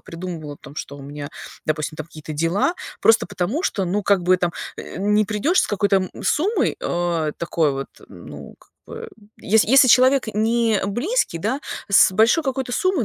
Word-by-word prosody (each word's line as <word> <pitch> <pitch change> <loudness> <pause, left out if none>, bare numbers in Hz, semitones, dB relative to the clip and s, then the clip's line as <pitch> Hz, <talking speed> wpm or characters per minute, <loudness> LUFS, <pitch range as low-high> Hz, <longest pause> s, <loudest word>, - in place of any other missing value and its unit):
Придумывала 165 -4 -7
о - - -18
том, 140 0 -14
что 140 - -6
у - - -10
меня, 145 +1 -7 0.4
допустим, 155 0 -2
там 155 - -6
какие-то 155 -1 -9
дела, 165 - 0 0.3
просто 225 0 +4
потому, 205 - -2
что, 195 - -1
ну, 200 +4 -1
как 200 -2 +2
бы 185 +1 +4
там, 175 -1 -1 0.3
э, - - -9
не 210 +2 +2
придешь 220 - +1
с - - 0
какой-то 200 -1 +1
м 185 -1 -1
суммой, 395 +9 +1
а, 170 -3 -1
такой 165 -3 0
вот, 135 0 -5 0.2
ну, - - -11
как - - -25 0.2
бы, 460 0 -8 0.3
есь 220 +2 +3
если 260 +3 +5
человек 260 +1 +5
не 225 0 +1
близкий, 240 - -1
да, 225 - -2 0.3
с 195 - +6
большой 230 - +3
какой-то 265 -2 -3
суммой, 370 - +1
200 Hz, 185 wpm, -21 LUFS, 165-245 Hz, 0.4 s, с